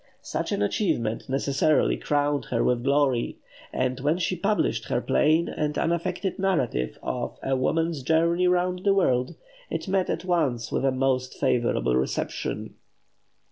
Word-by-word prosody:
Such - - -3
an - - 0
achievement 115 - -1
necessarily 140 +3 +2
crowned 145 -1 0
her 115 - 0
with 120 -1 +1
glory; 140 -3 +1 0.3
and 130 0 -1
when 150 +5 +1
she 185 0 -1
published 200 +4 0
her 120 - 0
plain 155 +6 +2
and 150 -1 -2
unaffected 180 +3 -1
narrative 125 - 0
of - - -3
"A 135 - +1
Woman's 160 +3 0
Journey 170 +5 +2
Round 180 0 +1
the 200 -1 +3
World," 130 -9 +1 0.3
it - - -4
met 190 -1 +1
at - - -2
once 150 -10 0
with - - 0
a 135 - +3
most 130 -1 0
favourable 120 - +1
reception. 65 +1 -2
145 Hz, 145 wpm, -26 LUFS, 130-175 Hz, 0.3 s, the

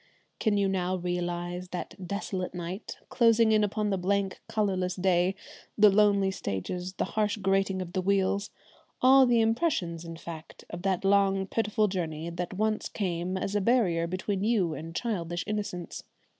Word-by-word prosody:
Can 215 -3 +2
you 200 -1 +2
now 185 -1 0
realise 175 0 -3
that 180 0 -6
desolate 190 -2 -3
night, 180 +4 -6
closing 230 -2 +4
in 215 -1 +4
upon 210 0 0
the 195 - 0
blank, 195 +1 0
colourless 190 -4 0
day, 185 0 +2 0.4
the 210 -1 +7
lonely 200 -1 +4
stages, 180 - -4
the - - -1
harsh 210 -1 0
grating 195 -1 +1
of 175 0 -11
the 185 - 0
wheels, 200 +1 +1 0.5
all 265 0 +7
the 235 -1 +4
impressions 225 - 0
in 165 -1 -8
fact 165 -1 -10
of 175 - -6
that 190 0 0
long, 195 -1 +3
pitiful 215 +1 +1
journey 165 -4 -3
that 175 +2 -4
once 215 +2 0
came 180 -2 -2
as 195 - -3
a 205 - +2
barrier 190 -7 +2
between 190 +2 -2
you 205 -7 +2
and 165 +2 -7
childish 175 -7 -2
innocence? 205 -4 -4
190 Hz, 160 wpm, -28 LUFS, 175-210 Hz, 0.5 s, the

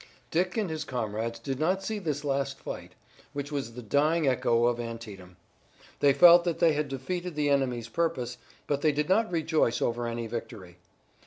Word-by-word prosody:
Dick 180 +5 0
and 205 -6 0
his 155 -1 -3
comrades 115 -2 -3
did 135 +3 -4
not 185 +5 +1
see 215 +1 -3
this 150 -6 -3
last 140 -1 -1
fight, - - -8 0.4
which 145 0 -5
was 135 -5 -3
the 125 +1 -8
dying 150 +7 +2
echo 120 -2 +2
of 120 0 +1
Antietam. 105 -6 -8 0.6
They 145 - +5
felt 170 +4 +8
that 170 -2 -1
they 165 -2 +4
had 150 0 -1
defeated 175 +6 -4
the 145 -1 +1
enemy's 125 -4 0
purpose, 125 -4 -2 0.3
but 145 -1 -1
they 155 - +4
did 150 +2 -1
not 215 +2 +3
rejoice 160 -7 +1
over 120 0 -1
any 115 0 -3
victory. 110 -6 -7
140 Hz, 180 wpm, -28 LUFS, 115-160 Hz, 0.6 s, felt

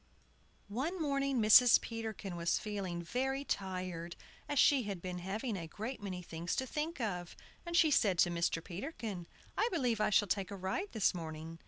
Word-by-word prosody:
ONE 275 - -2
morning 275 -3 +1
Mrs. 225 +3 +8
Peterkin 220 -5 -5
was 170 0 +1
feeling 190 -5 -4
very 265 +8 -1
tired, 180 -5 -3 0.3
as 290 - -1
she 275 0 +6
had 200 -5 -4
been 180 0 -5
having 215 +6 -3
a 170 -3 -5
great 220 +10 -5
many 185 -3 -5
things 170 +1 -3
to 260 - -1
think 305 +4 -3
of, 180 -7 -3 0.3
and 340 0 0
she 320 -3 +5
said 200 -9 +3
to 175 0 +4
Mr. 170 -1 0
Peterkin, 200 - -5 0.3
"I 460 - +2
believe 250 - +1
I - - +3
shall 205 0 +4
take 195 0 -1
a 200 - -5
ride 195 - -3
this 220 -4 +3
morning!" 165 -1 -6
205 Hz, 180 wpm, -34 LUFS, 175-260 Hz, 0.3 s, Mrs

